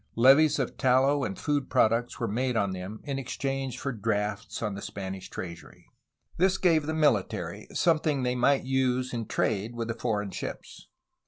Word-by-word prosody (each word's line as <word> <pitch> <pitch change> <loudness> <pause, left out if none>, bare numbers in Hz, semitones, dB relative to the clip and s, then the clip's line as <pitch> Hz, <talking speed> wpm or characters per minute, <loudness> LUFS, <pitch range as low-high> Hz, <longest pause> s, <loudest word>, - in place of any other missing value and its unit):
Levies 140 +6 +6
of 135 -4 -2
tallow 135 +2 +3
and 95 -6 -3
food 145 -2 -1
products 115 +4 +2
were 115 - -1
made 125 +3 0
on 100 -3 +1
them 95 +4 -6
in 140 -2 -3
exchange 135 -1 -3
for 135 - -3
drafts 105 -1 -2
on 105 -2 -1
the 100 - -6
Spanish 95 -1 -6
treasury. 85 -2 -8 0.5
This 185 +2 +3
gave 160 -6 +3
the 160 - -1
military 145 -11 0
something 155 -5 +2
they 125 0 +1
might 130 +3 +3
use 130 -1 0
in 115 -2 -3
trade 110 +2 -1
with 115 -1 -3
the - - 0
foreign 105 -4 -2
ships. - - -7
125 Hz, 170 wpm, -28 LUFS, 105-140 Hz, 0.5 s, Levies